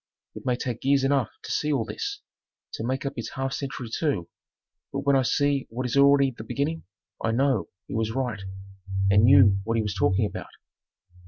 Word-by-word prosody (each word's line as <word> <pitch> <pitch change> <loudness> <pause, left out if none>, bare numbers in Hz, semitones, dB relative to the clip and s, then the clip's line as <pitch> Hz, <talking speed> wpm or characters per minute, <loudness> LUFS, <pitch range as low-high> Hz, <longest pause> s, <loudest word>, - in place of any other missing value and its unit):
It - - -9
may 125 - +3
take 120 -1 -4
years 140 0 +3
enough 135 -4 +2
to - - -6
see 150 - 0
all 130 -6 +1
this, 410 - -5 0.5
to - - -4
make 130 +4 -2
up 140 - -2
its 115 - -5
half 135 0 -2
century 135 -3 -4
too, 135 - -1 0.6
but 140 - -2
when 140 0 +3
I 135 - +4
see 140 +3 +1
what 125 +3 -4
is 125 - -2
already 140 -1 +5
the 110 - -8
beginning 150 +7 -2 0.4
I - - +1
know 130 -1 +1 0.2
he - - -8
was 110 -1 0
right 120 -3 -2 0.7
and 100 +2 +6
knew 100 -1 +6
what 115 +2 -1
he 110 - +1
was 105 -1 -2
talking 95 +2 +2
about. - - -6
130 Hz, 195 wpm, -26 LUFS, 110-140 Hz, 0.7 s, and